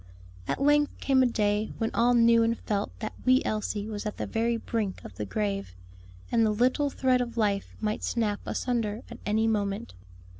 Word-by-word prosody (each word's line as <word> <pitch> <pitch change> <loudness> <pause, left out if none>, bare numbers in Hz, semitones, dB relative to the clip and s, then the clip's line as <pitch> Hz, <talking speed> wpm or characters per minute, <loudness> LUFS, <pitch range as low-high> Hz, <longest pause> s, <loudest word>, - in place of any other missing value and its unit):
At - - -1
length 290 +1 +3
came 265 -1 +3
a 255 - +5
day 210 -2 0
when 225 -1 -1
all 245 +1 +3
knew 230 0 +5
and 230 0 +2
felt 205 -1 -2
that 215 - -4
wee 255 +1 +4
Elsie 210 -1 -2
was 210 -2 -5
at 210 - -5
the - - -2
very 230 +1 0
brink 220 -4 -3
of - - -9
the 105 +4 -5
grave, 100 -2 -2 0.6
and 230 -1 +3
the 220 - +3
little 255 +7 +2
thread 255 -2 +2
of 240 -1 -4
life 205 -3 0
might 215 0 -2
snap 215 -4 0
asunder 230 -3 -1
at - - -9
any 220 +2 +2
moment. 200 - -1
225 Hz, 190 wpm, -28 LUFS, 205-240 Hz, 0.6 s, a